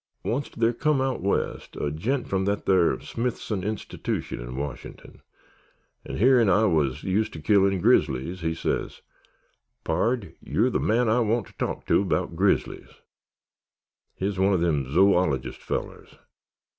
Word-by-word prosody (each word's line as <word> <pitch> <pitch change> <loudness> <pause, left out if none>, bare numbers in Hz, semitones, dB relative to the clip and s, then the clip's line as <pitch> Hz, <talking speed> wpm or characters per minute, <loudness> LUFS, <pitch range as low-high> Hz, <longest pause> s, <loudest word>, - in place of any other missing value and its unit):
Onct 135 +5 -2
thar 115 +1 +2
come 150 +3 +1
out 130 0 -1
west 100 +2 -2
a 75 - -2
gent 120 - -2
from 95 -1 0
that 100 +1 -1
thar 90 -3 +3
Smithson 115 -5 -3
Institution 105 - -4
in - - -7
Wash'n'ton, 70 -1 -7 0.9
'n' - - -5
hearin't 120 -2 +5
I 105 +4 +4
wuz 75 -7 +1
used 100 +3 0
ter 80 - -7
killin' 95 +3 +3
grizzlies 85 +8 +2
he 80 0 -1
sez, - - -3 0.8
'Pard, 115 -4 -1
you're 125 +4 +1
the - - 0
man 120 +2 +2
I 110 +3 +3
want 115 -1 +1
ter - - -18
talk - - -4
to - - +3
'baout 90 -3 -1
grizzlies.' 95 +3 0 1.2
He 95 - -3
wuz 100 -1 -2
one 95 +1 +3
o' - - +3
them 75 -6 0
zoologist 80 -8 +2
fellers. - - -5
95 Hz, 150 wpm, -25 LUFS, 85-115 Hz, 1.2 s, hearin't